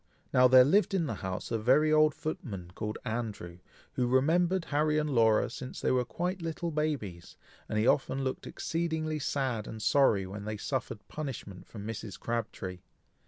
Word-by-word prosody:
Now, 125 Hz, 0 st, +7 dB
there 130 Hz, 0 st, +8 dB
lived 195 Hz, +6 st, +3 dB
in 175 Hz, -4 st, +1 dB
the 140 Hz, -, -2 dB
house 95 Hz, +3 st, -4 dB
a 115 Hz, -, 0 dB
very 140 Hz, +7 st, +4 dB
old 155 Hz, -1 st, +5 dB
footman, 100 Hz, -, -5 dB
called 105 Hz, +1 st, -4 dB
Andrew, 105 Hz, -7 st, -4 dB, 0.3 s
who 125 Hz, -, 0 dB
remembered 165 Hz, +8 st, +2 dB
Harry 150 Hz, +1 st, +2 dB
and 150 Hz, -1 st, 0 dB
Laura 110 Hz, -4 st, +4 dB
since 125 Hz, +2 st, -7 dB
they -, -, +1 dB
were 125 Hz, -1 st, +3 dB
quite 180 Hz, +7 st, -3 dB
little 165 Hz, +1 st, -3 dB
babies; 140 Hz, -, -3 dB, 0.3 s
and 110 Hz, -, -1 dB
he 110 Hz, -, +2 dB
often 135 Hz, 0 st, +2 dB
looked 130 Hz, -1 st, -3 dB
exceedingly 160 Hz, -2 st, -2 dB
sad 130 Hz, -6 st, -1 dB
and 110 Hz, -, -7 dB
sorry 110 Hz, -5 st, +3 dB
when 100 Hz, +2 st, -7 dB
they 110 Hz, 0 st, -3 dB
suffered 110 Hz, -3 st, -4 dB
punishment 130 Hz, -11 st, -6 dB
from 105 Hz, -2 st, -9 dB
Mrs. 110 Hz, -3 st, -6 dB
Crabtree. 100 Hz, -6 st, -4 dB
130 Hz, 170 wpm, -30 LUFS, 110-155 Hz, 0.3 s, there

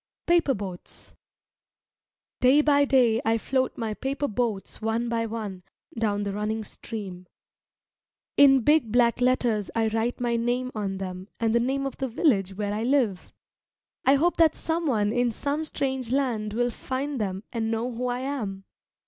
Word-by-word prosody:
jpg] -, -, -68 dB
PAPER 340 Hz, -5 st, +3 dB
BOATS 190 Hz, -4 st, -9 dB, 1.2 s
Day 265 Hz, +4 st, +5 dB
by 285 Hz, -1 st, +4 dB
day 245 Hz, -5 st, +3 dB
I 225 Hz, 0 st, +2 dB
float 260 Hz, +3 st, -1 dB
my 225 Hz, -2 st, -2 dB
paper 275 Hz, +5 st, -2 dB
boats 220 Hz, -4 st, -3 dB
one 225 Hz, +2 st, -1 dB
by 230 Hz, -1 st, 0 dB
one 210 Hz, -4 st, -5 dB, 0.3 s
down 210 Hz, -3 st, 0 dB
the 200 Hz, -1 st, -3 dB
running 215 Hz, +2 st, -2 dB
stream. 195 Hz, -4 st, -8 dB, 1.1 s
In 270 Hz, -2 st, +7 dB
big 295 Hz, -3 st, +3 dB
black 240 Hz, 0 st, +3 dB
letters 245 Hz, -5 st, +1 dB
I 225 Hz, -1 st, +2 dB
write 225 Hz, +2 st, -1 dB
my 240 Hz, -1 st, 0 dB
name 245 Hz, +2 st, -1 dB
on 200 Hz, -3 st, -3 dB
them 185 Hz, 0 st, -6 dB
and 225 Hz, -1 st, +1 dB
the 235 Hz, -, +4 dB
name 270 Hz, +3 st, 0 dB
of 275 Hz, -, -4 dB
the 265 Hz, -, -2 dB
village 200 Hz, -, +1 dB
where 205 Hz, 0 st, -2 dB
I 215 Hz, -, -2 dB
live. 235 Hz, -7 st, 0 dB, 0.7 s
I 270 Hz, -, +5 dB
hope 340 Hz, +5 st, +2 dB
that 325 Hz, -2 st, +5 dB
someone 275 Hz, -11 st, 0 dB
in 245 Hz, -1 st, +2 dB
some 290 Hz, +7 st, -2 dB
strange 265 Hz, -5 st, -3 dB
land 235 Hz, -6 st, 0 dB
will 245 Hz, +1 st, +1 dB
find 265 Hz, +2 st, -3 dB
them 190 Hz, -1 st, -3 dB
and 225 Hz, -2 st, -1 dB
know 230 Hz, +2 st, -1 dB
who 245 Hz, +1 st, -3 dB
I 245 Hz, 0 st, -2 dB
am. 220 Hz, -9 st, -4 dB
235 Hz, 165 wpm, -26 LUFS, 215-265 Hz, 1.2 s, In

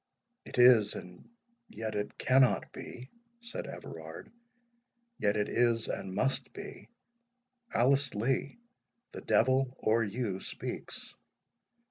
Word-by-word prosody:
"It -, -, -8 dB
is—and 105 Hz, -7 st, +4 dB, 0.4 s
yet 110 Hz, -1 st, -5 dB
it 105 Hz, 0 st, -3 dB
cannot 130 Hz, -1 st, +3 dB
be," 125 Hz, +2 st, -9 dB, 0.3 s
said 235 Hz, +1 st, -5 dB
Everard; -, -, -9 dB, 0.9 s
"yet 105 Hz, +1 st, +2 dB
it 105 Hz, 0 st, +1 dB
is, 115 Hz, -2 st, +2 dB
and 95 Hz, -1 st, -4 dB
must 135 Hz, +4 st, 0 dB
be. -, -, -9 dB, 0.8 s
Alice 135 Hz, +2 st, +2 dB
Lee, 130 Hz, -, 0 dB, 0.5 s
the -, -, -8 dB
devil 130 Hz, +1 st, +2 dB
or 115 Hz, +1 st, +2 dB
you 105 Hz, -2 st, -2 dB
speaks. -, -, -6 dB
120 Hz, 105 wpm, -31 LUFS, 105-130 Hz, 0.9 s, is—and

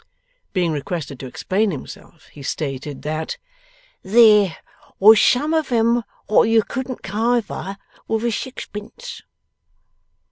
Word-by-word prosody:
Being 180 Hz, -4 st, +1 dB
requested 145 Hz, -2 st, -4 dB
to 130 Hz, -, -6 dB
explain 200 Hz, -, 0 dB
himself, 160 Hz, +1 st, -9 dB
he 145 Hz, -, -13 dB
stated 140 Hz, 0 st, -4 dB
that 155 Hz, +1 st, -3 dB, 0.6 s
there 210 Hz, -4 st, +5 dB, 0.4 s
was 215 Hz, +2 st, +7 dB
some 295 Hz, +5 st, +3 dB
of 315 Hz, -5 st, 0 dB
'em 235 Hz, 0 st, +3 dB, 0.3 s
wot 215 Hz, +1 st, +4 dB
you 225 Hz, -1 st, +4 dB
couldn't 260 Hz, +1 st, -5 dB
kiver 215 Hz, -1 st, -1 dB, 0.3 s
with 225 Hz, +1 st, -1 dB
a 235 Hz, -, +1 dB
sixpence. 255 Hz, -, -7 dB
210 Hz, 115 wpm, -21 LUFS, 160-235 Hz, 0.6 s, was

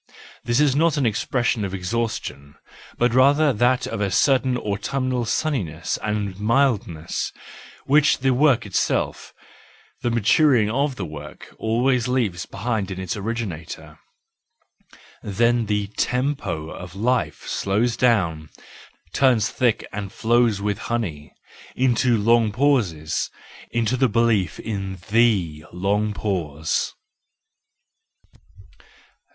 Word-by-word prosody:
This 120 Hz, +2 st, +1 dB
is 145 Hz, -3 st, +3 dB
not 165 Hz, +2 st, +3 dB
the 140 Hz, -3 st, 0 dB
expression 115 Hz, +1 st, 0 dB
of 95 Hz, -1 st, -3 dB
exhaustion,—but 110 Hz, -, -4 dB
rather 140 Hz, +3 st, +4 dB
that 125 Hz, +3 st, +2 dB
of 115 Hz, -2 st, -4 dB
a 100 Hz, -, +1 dB
certain 130 Hz, +4 st, +2 dB
autumnal 125 Hz, +4 st, -2 dB
sunniness 100 Hz, -, -2 dB
and 105 Hz, -2 st, -3 dB
mildness, 105 Hz, -, 0 dB, 0.5 s
which 150 Hz, +2 st, +4 dB
the 135 Hz, 0 st, +1 dB
work 130 Hz, -3 st, +3 dB
itself, 100 Hz, -, -1 dB, 0.7 s
the 120 Hz, -, 0 dB
maturing 115 Hz, 0 st, +3 dB
of 140 Hz, +2 st, 0 dB
the 100 Hz, -, -4 dB
work, 75 Hz, -1 st, -10 dB
always 120 Hz, +2 st, +1 dB
leaves 110 Hz, -8 st, -1 dB
behind 110 Hz, -5 st, -2 dB
in 95 Hz, -1 st, -5 dB
its 95 Hz, -2 st, -3 dB
originator. 105 Hz, -7 st, -5 dB, 1.2 s
Then 115 Hz, +3 st, +1 dB
the 105 Hz, -1 st, 0 dB
tempo 110 Hz, -, -2 dB
of 90 Hz, 0 st, -9 dB
life 110 Hz, -8 st, 0 dB
slows 110 Hz, +5 st, 0 dB
down—turns 105 Hz, -, 0 dB
thick 120 Hz, -4 st, +1 dB
and 100 Hz, -1 st, -5 dB
flows 115 Hz, -2 st, +2 dB
with 100 Hz, -1 st, -2 dB
honey—into 120 Hz, -, -2 dB
long 115 Hz, +1 st, +3 dB
pauses, 100 Hz, -, 0 dB, 0.4 s
into 115 Hz, +1 st, 0 dB
the 130 Hz, 0 st, +2 dB
belief 110 Hz, -6 st, +1 dB
in 95 Hz, -3 st, -4 dB
the 100 Hz, -10 st, +2 dB
long 100 Hz, +4 st, 0 dB
pause. 80 Hz, -8 st, -2 dB
110 Hz, 105 wpm, -22 LUFS, 95-125 Hz, 1.2 s, rather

